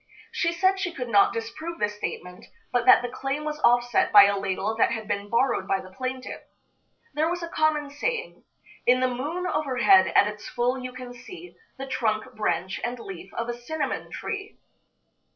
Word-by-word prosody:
She 335 - 0
said 375 +3 +2
she 355 - -2
could 250 -6 -5
not 200 -3 +5
disprove 310 +9 -5
the 210 - +1
statement, 180 -3 -7 0.2
but 245 -1 +1
that 255 - +8
the - - -1
claim 270 +4 -3
was 305 0 -4
offset 245 -3 +3
by 205 -1 +10
a 200 0 +2
ladle 195 +2 -2
that - - +4
had 220 -2 -4
been 200 0 -3
borrowed 245 +4 +1
by 195 - +1
the 185 0 -11
plaintiff. 255 +4 -5 0.7
There 310 +3 +1
was 350 0 -3
a - - -3
common 305 -3 0
saying: 470 +11 -3 0.4
"In 250 +1 +5
the 255 - +2
moon 290 +9 -3
overhead, 305 +4 +4
at - - +7
its 210 0 -7
full, 250 +1 0
you 255 0 -6
can 250 -1 -9
see 340 +9 -12 0.2
The 270 - -5
trunk, 220 -5 -1
branch 185 -2 -2
and 245 +1 -2
leaf 195 -4 -9
of 230 - -3
a 240 - -2
cinnamon 295 +6 -4
tree." 410 -1 -6
250 Hz, 190 wpm, -26 LUFS, 220-310 Hz, 0.7 s, by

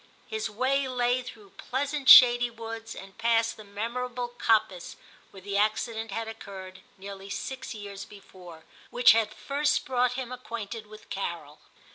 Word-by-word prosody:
His 435 -1 -3
way 260 +5 0
lay 250 0 +1
through 220 -5 -12
pleasant 275 +1 -2
shady 245 -1 +9
woods, 225 0 -8
and 195 0 -12
past 230 0 +2
the 215 - -12
memorable 240 +4 -4
coppice 220 -6 0 0.3
where 195 - -13
the 200 +1 -6
acci 215 +3 +1
dent 225 0 -5
had 225 +3 -4
occurred, 190 -4 -9 0.2
nearly 195 0 -9
six 260 +4 -5
years 200 -2 -8
before, 180 -5 -14 0.3
which 245 0 +6
had 220 -1 +2
first 290 +5 -1
brought 250 -1 +1
him 250 -1 -5
acquainted 230 -3 -7
with 215 0 -15
Carol. 170 -6 -5
225 Hz, 150 wpm, -27 LUFS, 200-250 Hz, 0.3 s, shady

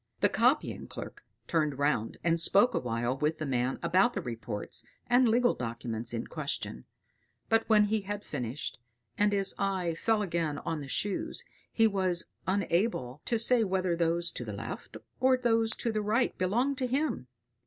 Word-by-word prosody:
The - - +5
copying - - +1
clerk - - -8 0.2
turned 150 -4 0
round 140 -6 0
and 170 0 +2
spoke 200 +8 +4
awhile 120 +1 -1
with 150 +2 +1
the 155 - -3
man 125 -1 0
about 185 +8 +3
the - - -2
reports 115 -4 -5 0.2
and 245 0 +4
legal 245 +2 +4
documents 115 -1 -3
in 115 -1 -3
question; 65 - -5 0.6
but 225 0 +2
when 215 -1 +6
he 215 +1 +1
had 205 +1 -5
finished, 125 -1 -5 0.4
and 205 0 +3
his 195 -1 +4
eye 190 -4 0
fell 215 +6 +1
again 165 -5 -1
on 165 +1 -3
the 140 - -7
Shoes, 195 +8 -2 0.3
he 225 - +3
was 185 -5 +1 0.2
unable 185 - 0
to 235 - +2
say 230 +1 +3
whether 185 -3 0
those 170 0 +1
to - - -5
the 105 -3 -6
left 110 +4 -7 0.2
or 260 0 +4
those 225 -2 +2
to 230 - -1
the 215 -1 -1
right 220 +4 +1
belonged 245 +10 0
to 255 - 0
him. 260 - -1
185 Hz, 170 wpm, -30 LUFS, 140-225 Hz, 0.6 s, when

